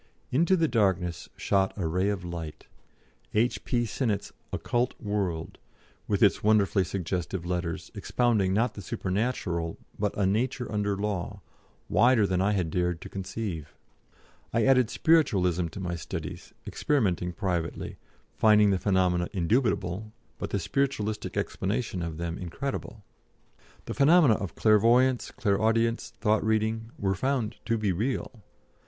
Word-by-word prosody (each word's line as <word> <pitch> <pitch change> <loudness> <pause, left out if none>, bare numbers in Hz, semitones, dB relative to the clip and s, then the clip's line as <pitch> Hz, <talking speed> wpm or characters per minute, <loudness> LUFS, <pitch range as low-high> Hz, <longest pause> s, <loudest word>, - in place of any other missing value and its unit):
Into 170 +8 +3
the 165 -1 +3
darkness 95 - 0
shot 95 -1 +1
a 95 - -2
ray 90 +5 +1
of 95 -4 -3
light 80 -3 -6 0.7
A.P. 120 +2 +1
Sinnett's 110 -2 -2 0.2
"Occult 120 +1 -1
World," 100 -7 -3 0.5
with 105 +1 +1
its 100 - +4
wonderfully 105 -2 +3
suggestive 90 0 -3
letters, 90 -2 -3
expounding 110 -6 +1
not 110 +4 +1
the 100 - -8
supernatural 95 -4 -2 0.2
but 105 0 -1
a 100 - +2
nature 115 +4 0
under 105 -2 0
law, 100 -3 -3 0.5
wider 120 -1 +4
than 95 -1 0
I 100 +2 +2
had 90 -5 -1
dared 90 -1 0
to - - -8
conceive. 95 -5 -5 0.8
I 115 -1 +2
added 130 -4 +4
Spiritualism 95 - +2
to 80 - -8
my 90 -2 -3
studies, 80 - -6
experimenting 95 - 0
privately, 90 -3 -3 0.4
finding 105 -2 +5
the 95 - +1
phenomena 90 -3 +2
indubitable, 100 0 0 0.3
but - - -3
the - - 0
spiritualistic 110 0 -1
explanation 100 -1 -2
of 85 -2 -4
them 85 0 -4
incredible. 110 - -5 0.8
The - - -4
phenomena 150 -3 +6
of 100 -5 -4
clairvoyance, 120 +4 +4
clairaudience, 115 +1 +1
thought 110 -1 +2
reading, 110 +1 0
were 95 -1 0
found 115 +1 -1
to 115 -1 +1
be 105 -3 0
real. 115 +3 -2
100 Hz, 135 wpm, -28 LUFS, 90-115 Hz, 0.8 s, phenomena